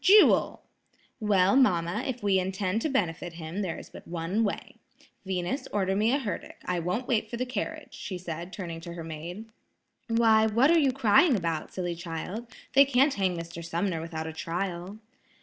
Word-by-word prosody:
"Jewel!" 410 +2 +6 0.6
"Well, 200 -2 +3
mamma, 185 -4 +3
if 250 -3 -4
we 195 -2 +3
intend 190 +3 -1
to 310 - 0
benefit 175 - -1
him, 165 +4 -5
there 180 -5 -2
is - - -11
but - - -12
one 175 +6 -1
way. 205 - -3 0.5
Venus, 185 +7 -2
order 190 -2 +1
me 215 +3 +3
a 275 - +3
herdic; 230 -8 -5
I 180 -1 0
won't 180 +9 -2
wait 220 -3 +1
for 235 - -4
the 255 - -1
carriage," 305 +4 -4
she 185 - -5
said, 175 0 -6
turning 170 -4 -6
to 170 0 -7
her 170 -1 -6
maid. 165 +6 -7 0.6
"Why, 225 -1 +4
what 235 +8 +4
are 335 - +6
you 280 -4 +3
crying 255 - +5
about, 165 -5 -2
silly 175 -2 -2
child; 170 +7 -5 0.3
they 275 - +8
can't 275 +1 +3
hang 185 -3 0
Mr. 170 0 -7
Sumner 170 0 -1
without 160 -1 -5
a 160 - -5
trial." 175 +4 -4
190 Hz, 185 wpm, -28 LUFS, 170-230 Hz, 0.6 s, they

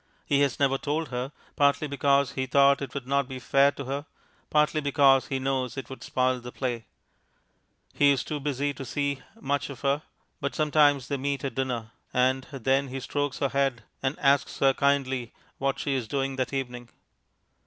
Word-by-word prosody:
He 140 - +2
has 140 -2 +1
never 135 -1 +2
told 150 0 -2
her; 125 +2 -3 0.2
partly 145 +1 +3
because 140 -1 +2
he 130 0 -3
thought 140 +1 +5
it 135 -1 -6
would 140 -3 -4
not 140 0 +1
be 130 -1 -6
fair 135 +3 +4
to 140 - -7
her, 140 +3 -4 0.4
partly 150 +1 +2
because 140 -2 +4
he 135 - -1
knows 130 -1 -1
it 135 -1 -6
would 130 - -8
spoil 130 0 +1
the 125 0 -9
play. 120 -4 -3 1.1
He 145 - +4
is 140 -2 +2
too 150 - -4
busy 145 0 -1
to 140 - -7
see 140 +1 -2 0.2
much 145 -8 -1
of 135 -3 -9
her, 140 +1 +1 0.4
but 140 0 -3
sometimes 145 -3 +3
they 140 - -1
meet 140 0 -2
at 135 - -2
dinner, 125 -4 -3 0.2
and 130 +1 +2
then 135 +1 +1
he 135 +1 -5
strokes 145 +2 -2
her 140 - 0
head 135 -4 0 0.2
and 135 +2 -1
asks 140 0 +2
her 135 -1 +4
kindly 135 -3 0 0.3
what 135 0 0
she 140 - -1
is 130 -4 -2
doing 135 +1 -1
that 130 - -1
evening. 125 -3 -4
135 Hz, 190 wpm, -27 LUFS, 130-140 Hz, 1.1 s, thought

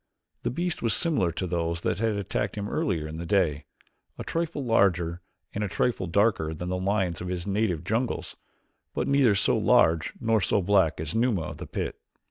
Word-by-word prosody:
The - - -1
beast 175 +5 -2
was 115 - +3
similar 145 - +1
to 90 - -3
those 85 -1 -2
that 85 - -1
had 110 -1 +1
attacked 100 0 -2
him 105 0 -3
earlier 80 -7 -1
in 80 +1 -7
the 85 - -5
day, 80 -7 +1 0.5
a - - -5
trifle 165 -4 -2
larger 90 -6 +2 0.3
and 105 - -2
a - - 0
trifle 105 -1 0
darker 90 -4 +1
than 90 +3 -5
the 90 - -1
lions 95 -2 0
of 90 - -4
his 90 -1 -3
native 100 -5 0
jungles, 115 +3 -2 0.6
but - - -1
neither 140 -7 +4
so 100 - +2
large 80 0 +3
nor 115 -3 +2
so 95 - +2
black 95 -3 +2
as 80 -1 -3
Numa 115 -5 +2
of 75 - -6
the - - -7
pit. - - -4
95 Hz, 195 wpm, -27 LUFS, 85-110 Hz, 0.6 s, neither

